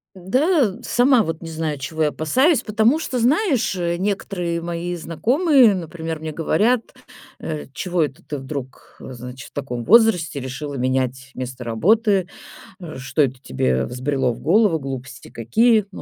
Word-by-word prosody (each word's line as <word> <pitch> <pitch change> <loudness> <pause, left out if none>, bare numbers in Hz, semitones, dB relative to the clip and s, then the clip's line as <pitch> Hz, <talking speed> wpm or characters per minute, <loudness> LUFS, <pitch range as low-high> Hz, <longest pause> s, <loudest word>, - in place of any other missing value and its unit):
Да, 255 - +1
сама 245 -1 +4
вот 165 -3 -4
не 165 - -7
знаю, 155 -2 -3
чего 155 +4 -2
я 150 - +3
опасаюсь, 260 - +2
потому 220 +7 +2
что, 255 -5 -3
знаешь, 260 - +2
э, 170 -1 -1
некоторые 180 -3 -2
мои 170 +1 -4
знакомые, 245 - +3
например, 165 -3 -5
мне 155 -1 -5
говорят, 215 +10 +2 0.6
э: 155 -2 -5
"Чего 175 +3 0
это 145 +4 -5
ты 150 - -6
вдруг, 135 -1 -8
значит, 125 0 -9
в - - -52
таком 125 -4 -4
возрасте 180 - +4
решила 135 +3 -6
менять 130 0 -1
место 130 -1 -6
работы? 195 - +2 0.5
Э, 160 -5 -8
что 135 +4 -3
это 130 -2 -1
тебе 65 - 0
взбрело 130 0 -1
в - - -9
голову? 190 +1 +3
Глупости 135 -1 -7
какие". 215 - +2
Ну, - - -9
165 Hz, 155 wpm, -21 LUFS, 135-215 Hz, 0.6 s, сама